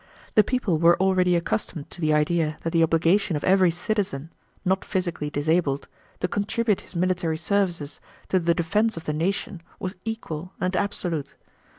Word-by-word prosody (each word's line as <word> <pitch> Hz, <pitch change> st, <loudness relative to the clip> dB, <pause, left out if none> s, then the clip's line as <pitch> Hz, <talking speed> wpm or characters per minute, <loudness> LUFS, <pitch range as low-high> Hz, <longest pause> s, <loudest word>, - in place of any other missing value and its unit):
The 215 Hz, -, +6 dB
people 205 Hz, -8 st, 0 dB
were 170 Hz, +1 st, +5 dB
already 185 Hz, -1 st, +3 dB
accustomed 170 Hz, -3 st, -2 dB
to 175 Hz, -, -10 dB
the 155 Hz, -1 st, +2 dB
idea 155 Hz, 0 st, +1 dB
that 165 Hz, -, -1 dB
the 165 Hz, -, +3 dB
obligation 165 Hz, +3 st, +3 dB
of 145 Hz, -, -3 dB
every 185 Hz, -1 st, +5 dB
citizen, 175 Hz, -4 st, -2 dB, 0.3 s
not 190 Hz, +1 st, +1 dB
physically 175 Hz, -6 st, -2 dB
disabled, 145 Hz, -1 st, 0 dB, 0.3 s
to -, -, +1 dB
contribute 205 Hz, +2 st, 0 dB
his -, -, -14 dB
military 175 Hz, -2 st, 0 dB
services 175 Hz, -4 st, -1 dB, 0.3 s
to 185 Hz, -, +3 dB
the 170 Hz, -1 st, +2 dB
defense 205 Hz, +5 st, +1 dB
of 165 Hz, -, -6 dB
the 150 Hz, -, -1 dB
nation 185 Hz, +4 st, -2 dB, 0.2 s
was 185 Hz, +1 st, -4 dB
equal 185 Hz, -6 st, -5 dB
and 185 Hz, +1 st, 0 dB
absolute. 175 Hz, -7 st, -2 dB
175 Hz, 165 wpm, -25 LUFS, 160-195 Hz, 0.3 s, The